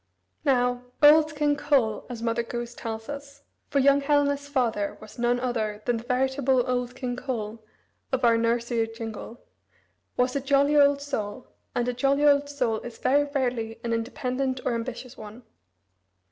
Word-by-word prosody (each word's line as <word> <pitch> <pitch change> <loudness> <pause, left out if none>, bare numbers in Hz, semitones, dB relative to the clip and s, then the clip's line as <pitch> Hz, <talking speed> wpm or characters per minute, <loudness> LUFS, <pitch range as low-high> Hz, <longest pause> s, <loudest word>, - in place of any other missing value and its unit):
Now, 250 -2 +1 0.2
"old 305 +1 +7
King 295 0 +2
Cole," 275 -7 +1
as 235 -2 -6
Mother 230 0 +1
Goose 240 0 -5
tells 225 -1 -6
us 280 -1 -8 0.3
for - - 0
young 280 +1 +5
Helena's 285 0 +1
father 235 -8 -1
was 215 +2 -13
none 240 +1 +2
other 220 -4 -2
than 240 -1 +1
the 225 - -7
veritable 265 0 +1
"old 250 -1 -2
King 250 -2 -3
Cole" 230 -4 -5 0.5
of 260 -2 +1
our 230 -1 +5
nursery 230 0 +1
jingle 225 0 -8 0.8
was 250 +1 +1
a 280 - 0
"jolly 280 +2 +3
old 285 -1 +5
soul," 245 -4 -4 0.3
and 245 0 0
a 250 - 0
jolly 275 +4 +2
old 285 0 +4
soul 250 -6 -1
is 235 -1 -9
very 285 +2 +3
rarely 240 -4 -1
an 235 -1 -1
independent 255 +3 -2
or 245 - +1
ambitious 250 +2 -5
one. 215 +3 -10
250 Hz, 160 wpm, -26 LUFS, 230-280 Hz, 0.8 s, old